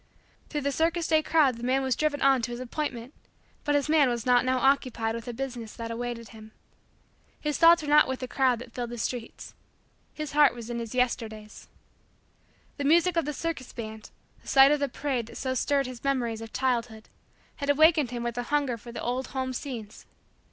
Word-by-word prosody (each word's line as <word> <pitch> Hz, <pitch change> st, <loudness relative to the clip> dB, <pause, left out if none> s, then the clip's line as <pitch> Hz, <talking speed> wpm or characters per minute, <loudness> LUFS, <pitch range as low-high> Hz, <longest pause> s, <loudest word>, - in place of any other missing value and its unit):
Through 295 Hz, -, -2 dB
the 280 Hz, +1 st, 0 dB
circus 330 Hz, +4 st, 0 dB
day 315 Hz, -1 st, +3 dB
crowd 300 Hz, -6 st, +3 dB
the 235 Hz, -, -10 dB
man 260 Hz, +2 st, +1 dB
was 260 Hz, -2 st, +1 dB
driven 300 Hz, -2 st, 0 dB
on 270 Hz, -2 st, +4 dB
to 230 Hz, -, -3 dB
his 240 Hz, 0 st, -5 dB
appointment 255 Hz, -1 st, -4 dB, 0.5 s
but 290 Hz, -1 st, +1 dB
his 290 Hz, 0 st, +1 dB
mind 300 Hz, -4 st, +4 dB
was 235 Hz, -2 st, -3 dB
not 245 Hz, 0 st, +4 dB
now 255 Hz, 0 st, +1 dB
occupied 255 Hz, -4 st, +1 dB
with 230 Hz, -1 st, -6 dB
the 245 Hz, -, -4 dB
business 240 Hz, -3 st, -6 dB
that 230 Hz, 0 st, -6 dB
awaited 235 Hz, -1 st, -5 dB
him. 220 Hz, -1 st, -13 dB, 0.9 s
His 300 Hz, -1 st, -2 dB
thoughts 335 Hz, -1 st, +7 dB
were -, -, -5 dB
not 300 Hz, +1 st, +6 dB
with 260 Hz, 0 st, -3 dB
the 255 Hz, -, -5 dB
crowd 255 Hz, -1 st, +2 dB
that 235 Hz, 0 st, -11 dB
filled 240 Hz, -1 st, -4 dB
the 240 Hz, -, -6 dB
streets. 235 Hz, +1 st, -5 dB, 0.6 s
His 305 Hz, -1 st, -6 dB
heart 290 Hz, -3 st, +5 dB
was 235 Hz, 0 st, -7 dB
in 235 Hz, -, -3 dB
his 230 Hz, +1 st, -6 dB
Yesterdays. 220 Hz, -4 st, -2 dB, 1.1 s
The 285 Hz, -, -3 dB
music 340 Hz, +4 st, +4 dB
of 335 Hz, -3 st, +1 dB
the 300 Hz, -, -2 dB
circus 300 Hz, -3 st, -5 dB
band, 220 Hz, -1 st, -8 dB, 0.3 s
the -, -, -20 dB
sight 270 Hz, +1 st, +7 dB
of 295 Hz, -, +2 dB
the 280 Hz, -1 st, -1 dB
parade 255 Hz, -3 st, -2 dB
that -, -, -10 dB
so 260 Hz, -1 st, -2 dB
stirred 275 Hz, +2 st, +1 dB
his 250 Hz, -2 st, -8 dB
memories 240 Hz, -5 st, -1 dB
of 225 Hz, -1 st, -8 dB
childhood, 235 Hz, -4 st, -2 dB, 0.5 s
had 285 Hz, -1 st, -4 dB
awakened 310 Hz, -1 st, +5 dB
within 240 Hz, -1 st, -4 dB
him 235 Hz, -, -2 dB
a 245 Hz, -, -1 dB
hunger 275 Hz, -1 st, 0 dB
for 235 Hz, +2 st, -11 dB
the -, -, -6 dB
old 250 Hz, +2 st, -2 dB
home 260 Hz, -1 st, -3 dB
scenes. 235 Hz, -5 st, -7 dB
255 Hz, 210 wpm, -27 LUFS, 235-285 Hz, 1.1 s, thoughts